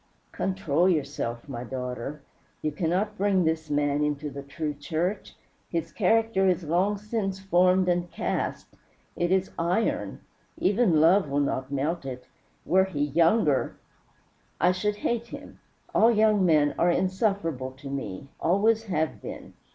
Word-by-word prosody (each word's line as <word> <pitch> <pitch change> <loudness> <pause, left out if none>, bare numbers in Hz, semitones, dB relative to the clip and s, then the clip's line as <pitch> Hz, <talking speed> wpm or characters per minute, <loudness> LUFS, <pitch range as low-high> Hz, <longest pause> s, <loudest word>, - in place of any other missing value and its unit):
"Control 185 -2 +1
yourself, 140 -7 -2
my 125 -4 -5
daughter. 125 +3 -5 0.4
You 155 - 0
cannot 185 +7 -1
bring 195 -2 +3
this 160 -1 -1
man 145 0 +1
into 150 0 -2
the 140 - -7
true 150 +2 -4
church. 165 +7 -3 0.3
His 165 -1 -3
character 225 -1 +2
is 180 -1 +1
long 180 +6 +1
since 205 -2 -3
formed 185 -1 +3
and 175 -1 0
cast - - -3 0.4
it 175 +1 0
is 190 0 +1
iron. 180 +7 -1 0.4
Even 195 -5 +3
love 165 +1 +4
will 140 +1 0
not 135 -1 -1
melt 150 +5 -1
it. 125 -2 -7 0.4
Were 190 +1 +4
he 185 -7 -6
younger 165 0 +2 0.4
" - - -38
"I 180 +3 +4
should 205 +3 -1
hate 235 0 0
him. 285 +3 -10 0.3
All 225 - +5
young 215 -3 +3
men 150 -3 +3
are 175 - +4
insufferable 185 - 0
to 135 +1 -11
me 135 -5 -5
always 215 +6 +2
have 160 -6 -2
been. - - -8
170 Hz, 145 wpm, -26 LUFS, 145-195 Hz, 0.4 s, All